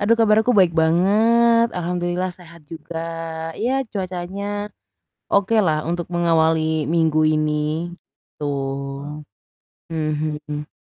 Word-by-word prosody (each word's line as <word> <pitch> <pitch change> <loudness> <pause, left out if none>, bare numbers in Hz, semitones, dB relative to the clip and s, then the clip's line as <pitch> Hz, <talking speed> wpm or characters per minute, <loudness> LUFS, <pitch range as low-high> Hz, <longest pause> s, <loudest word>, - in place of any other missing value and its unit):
Aduh 210 +3 +4
kabar 215 -2 +4
aku 250 - +3
baik 180 -3 +5
banget, 225 +8 +4
alhamdulillah 175 +1 -1
sehat 170 -2 -15
juga, 165 +1 -8 0.6
iya 245 +4 0 0.2
cuacanya 185 0 -4 0.9
okelah 200 -5 +3
untuk 175 0 -2
mengawali 160 -2 +2
minggu 160 -2 +2
ini, 155 0 +1 0.8
gitu. 150 - -7 1.5
Mhm. 150 -1 -3
175 Hz, 95 wpm, -21 LUFS, 160-200 Hz, 1.5 s, baik